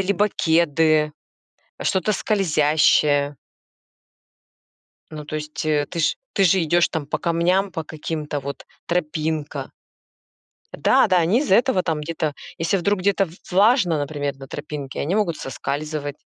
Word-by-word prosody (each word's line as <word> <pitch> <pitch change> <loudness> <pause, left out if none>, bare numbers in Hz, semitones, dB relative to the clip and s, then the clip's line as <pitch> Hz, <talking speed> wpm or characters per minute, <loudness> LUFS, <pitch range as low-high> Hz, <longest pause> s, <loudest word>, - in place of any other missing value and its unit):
либо 200 +2 +1
кеды, 160 -3 +2 0.7
что-то 190 +3 +1
скользящее. 150 -7 +2 1.8
Ну, 155 -1 -7
то 155 - -5
есть, 150 0 -5
э, 150 -2 +1
ты 170 - -4
ж 155 - +2 0.2
ты 195 - +2
же 185 0 +4
идешь 170 +2 +3
там 155 -3 -4
по 145 - -2
камням, 180 +4 +1
по 165 - -3
каким-то 155 -1 -4
вот, 140 +1 -7 0.2
тропинка. 155 -3 -2 1.0
Да-да, 185 -3 +3
они 175 +7 +3
из-за 280 -10 +2
этого 235 -4 +3
там 160 -3 -1
где-то, 155 -1 -3 0.2
если 165 +4 +1
вдруг 195 +2 0
где-то 195 +1 +2
в 165 - -14 0.2
влажно, 195 - +4
например, 145 -1 -3
на 135 0 -11
тропинке, 145 -1 -6
они 160 +7 -1
могут 205 -7 0
соскальзывать. 145 +2 -4
160 Hz, 135 wpm, -22 LUFS, 150-185 Hz, 1.8 s, же